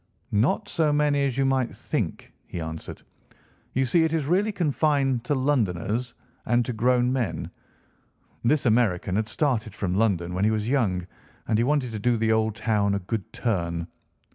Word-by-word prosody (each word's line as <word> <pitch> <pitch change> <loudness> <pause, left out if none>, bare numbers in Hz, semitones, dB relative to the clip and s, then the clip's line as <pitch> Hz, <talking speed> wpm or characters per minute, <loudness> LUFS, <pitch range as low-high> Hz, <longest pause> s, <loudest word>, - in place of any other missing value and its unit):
"'Not 105 +6 +1
so 155 -2 +1
many 145 -1 +2
as 135 -2 -2
you 135 - +2
might 130 -2 0
think,' - - -3
he 85 - -6
answered. 80 0 -6 0.7
'You 130 +1 +2
see 160 +7 +3
it 160 0 0
is 160 -4 0
really 190 +8 +2
confined 145 - +1
to 145 - +1
Londoners, 120 - 0 0.3
and 120 0 +2
to 125 - -3
grown 125 +2 +2
men. 105 - -2 0.9
This 135 +4 +2
American 110 -6 +2
had 110 +1 0
started 115 -7 -1
from 90 -3 -2
London 95 -4 +1
when 95 +2 -1
he 105 - +4
was 110 0 -1
young, 105 -10 +1 0.4
and 110 - +1
he - - +3
wanted 135 -2 +1
to 110 - -4
do 120 +2 +2
the 110 0 +1
old 110 -1 +1
town 105 -3 +1
a - - -1
good 100 +1 -4
turn. 85 -7 -1
115 Hz, 175 wpm, -25 LUFS, 105-135 Hz, 0.9 s, he